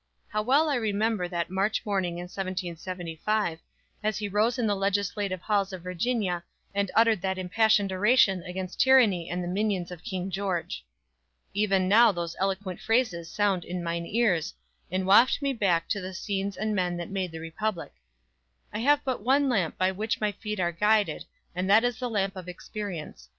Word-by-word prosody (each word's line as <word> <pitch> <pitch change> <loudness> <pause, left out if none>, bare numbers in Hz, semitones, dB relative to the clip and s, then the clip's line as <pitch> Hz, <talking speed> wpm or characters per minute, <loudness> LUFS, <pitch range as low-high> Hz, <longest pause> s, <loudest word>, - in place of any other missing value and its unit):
How 215 - -1
well 275 +8 +3
I 285 -3 +1
remember 215 -3 0
that 175 0 -3
March 195 +3 0
morning 190 -4 -1
in 175 - -5
1775, 180 0 -3 0.4
as 215 -1 -1
he 210 - -2
rose 215 +5 +1
in 240 - 0
the 205 -1 +2
legislative 195 -1 -1
halls 200 -1 0
of 185 -2 -7
Virginia, 180 -1 -1 0.3
and 200 -1 0
uttered 225 -3 +4
that 190 0 -1
impassioned 200 +1 +2
oration 195 -1 +4
against 185 +1 -6
tyranny 225 -11 +4
and 180 +1 -2
the - - -4
minions 190 -1 -1
of 175 -1 -9
King 190 -3 -4
George. 180 - -2 0.7
Even 195 -2 +2
now 225 +4 +6
those 170 -3 -4
eloquent 195 -1 -2
phrases 220 -8 0
sound 200 -4 +1
in 180 +1 -5
mine 170 0 -3
ears, 200 -8 +1 0.3
and 185 0 -1
waft 210 +7 +6
me 280 -1 0
back 180 -8 +1
to 200 - -1
the 185 0 -6
scenes 195 0 -3
and 215 +1 -1
men 180 -2 0
that 175 +2 -6
made 190 -3 -2
the 165 - -7
Republic: 165 - -4 0.8
"I 210 - -2
have 290 +4 +3
but 260 -4 -1
one 270 +5 +3
lamp 190 -10 0
by 185 0 +2
which 215 +4 -2
my 210 -1 +1
feet 210 0 -5
are 175 -1 +1
guided, 205 -2 +1 0.3
and 180 +2 -2
that 215 +3 +6
is 245 -1 0
the 250 -1 -2
lamp 195 -3 -1
of 180 -1 -7
experience. 175 - -7
195 Hz, 180 wpm, -27 LUFS, 180-215 Hz, 0.8 s, now